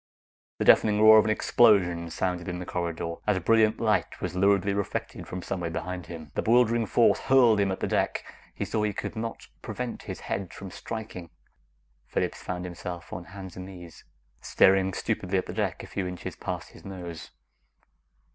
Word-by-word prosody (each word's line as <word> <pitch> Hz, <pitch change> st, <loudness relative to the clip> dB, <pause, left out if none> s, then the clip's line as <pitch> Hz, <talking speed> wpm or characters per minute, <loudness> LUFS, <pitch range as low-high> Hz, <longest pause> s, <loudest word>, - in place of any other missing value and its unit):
The -, -, -1 dB
deafening 105 Hz, -1 st, +5 dB
roar 110 Hz, 0 st, +9 dB
of 105 Hz, -, +3 dB
an -, -, 0 dB
explosion 100 Hz, -6 st, +4 dB
resounded 90 Hz, +1 st, -2 dB
in 90 Hz, -, -3 dB
the 90 Hz, -, -6 dB
corridor 85 Hz, -1 st, -3 dB
as 105 Hz, -2 st, +3 dB
a -, -, 0 dB
brilliant 110 Hz, +3 st, +3 dB
light 105 Hz, -4 st, 0 dB
was 90 Hz, -1 st, -4 dB
luridly 100 Hz, +1 st, +3 dB
reflected 100 Hz, -1 st, -4 dB
from 90 Hz, 0 st, -6 dB
somewhere 90 Hz, -3 st, -3 dB
behind 90 Hz, +2 st, -5 dB
him. 80 Hz, -4 st, -9 dB
The -, -, -1 dB
bewildering 115 Hz, -1 st, +3 dB
force 120 Hz, -, +4 dB
hurled 125 Hz, -5 st, +5 dB
him 100 Hz, -1 st, +2 dB
at 95 Hz, -, -4 dB
the -, -, 0 dB
deck; -, -, 0 dB, 0.3 s
he -, -, -2 dB
saw 110 Hz, -, -1 dB
he 105 Hz, -1 st, 0 dB
could 105 Hz, -, -5 dB
not 115 Hz, +1 st, -5 dB, 0.2 s
prevent 125 Hz, -1 st, -5 dB
his -, -, -7 dB
head 95 Hz, -3 st, -4 dB
from 95 Hz, -2 st, -8 dB
striking 110 Hz, -7 st, -7 dB, 0.8 s
Phillips -, -, -2 dB
found 90 Hz, 0 st, -4 dB
himself 85 Hz, 0 st, -7 dB
on 85 Hz, -, -6 dB
hands 95 Hz, 0 st, -10 dB
and 95 Hz, 0 st, -7 dB
knees, 90 Hz, -4 st, -11 dB, 0.4 s
staring 95 Hz, 0 st, +4 dB
stupidly 95 Hz, +2 st, -1 dB
at 95 Hz, -, 0 dB
the -, -, -6 dB
deck -, -, -2 dB
a -, -, -9 dB
few 95 Hz, -2 st, -3 dB
inches 90 Hz, -1 st, -6 dB
past -, -, -5 dB
his -, -, -15 dB
nose. 90 Hz, -4 st, -8 dB
95 Hz, 185 wpm, -27 LUFS, 90-110 Hz, 0.8 s, roar